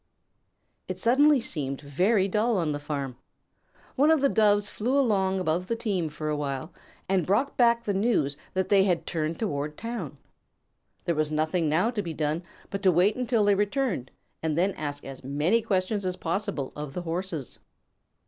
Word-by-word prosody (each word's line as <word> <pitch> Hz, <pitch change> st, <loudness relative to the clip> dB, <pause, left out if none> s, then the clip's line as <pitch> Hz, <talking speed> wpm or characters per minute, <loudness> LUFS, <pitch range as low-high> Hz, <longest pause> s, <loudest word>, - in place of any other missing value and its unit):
It -, -, -4 dB
suddenly 285 Hz, +4 st, +4 dB
seemed 140 Hz, -, -2 dB
very 185 Hz, +8 st, +2 dB
dull 215 Hz, +3 st, +1 dB
on 165 Hz, -4 st, 0 dB
the 145 Hz, -, -3 dB
farm. 140 Hz, -4 st, -4 dB, 0.8 s
One 290 Hz, +4 st, +4 dB
of 320 Hz, -1 st, +5 dB
the 275 Hz, 0 st, +3 dB
Doves 205 Hz, -3 st, +3 dB
flew 245 Hz, +6 st, -1 dB
along 195 Hz, -7 st, +2 dB
above 180 Hz, +1 st, -1 dB
the 230 Hz, -, 0 dB
team 195 Hz, -8 st, -1 dB
for 150 Hz, +1 st, -5 dB
a 150 Hz, -, 0 dB
while 145 Hz, +2 st, -4 dB, 0.3 s
and 190 Hz, -2 st, +2 dB
brought 205 Hz, -, +1 dB
back 235 Hz, -1 st, +4 dB
the 205 Hz, -, -1 dB
news 195 Hz, -, +1 dB, 0.2 s
that 190 Hz, -1 st, 0 dB
they 195 Hz, -1 st, +5 dB
had 180 Hz, -4 st, +1 dB
turned 160 Hz, 0 st, -2 dB
toward 150 Hz, -7 st, -3 dB
town. 215 Hz, -, -5 dB, 0.9 s
There 170 Hz, -, +1 dB
was 155 Hz, -1 st, 0 dB
nothing 155 Hz, +1 st, +1 dB
now 180 Hz, +10 st, +2 dB
to 220 Hz, -4 st, -2 dB
be 165 Hz, -5 st, -5 dB
done 155 Hz, +2 st, -1 dB, 0.3 s
but 195 Hz, 0 st, -3 dB
to 190 Hz, -2 st, +5 dB
wait 180 Hz, +5 st, +3 dB
until 240 Hz, -4 st, +1 dB
they 205 Hz, -, +5 dB
returned 205 Hz, -, 0 dB, 0.3 s
and 160 Hz, -1 st, -1 dB
then 190 Hz, +3 st, +3 dB
ask 145 Hz, -4 st, -5 dB
as 135 Hz, -1 st, -9 dB
many 150 Hz, -, +1 dB
questions 200 Hz, -1 st, 0 dB
as 185 Hz, -1 st, -1 dB
possible 180 Hz, -5 st, -3 dB
of 150 Hz, -2 st, -6 dB
the 180 Hz, -, -3 dB
Horses. 165 Hz, -4 st, -4 dB
185 Hz, 180 wpm, -27 LUFS, 150-215 Hz, 0.9 s, of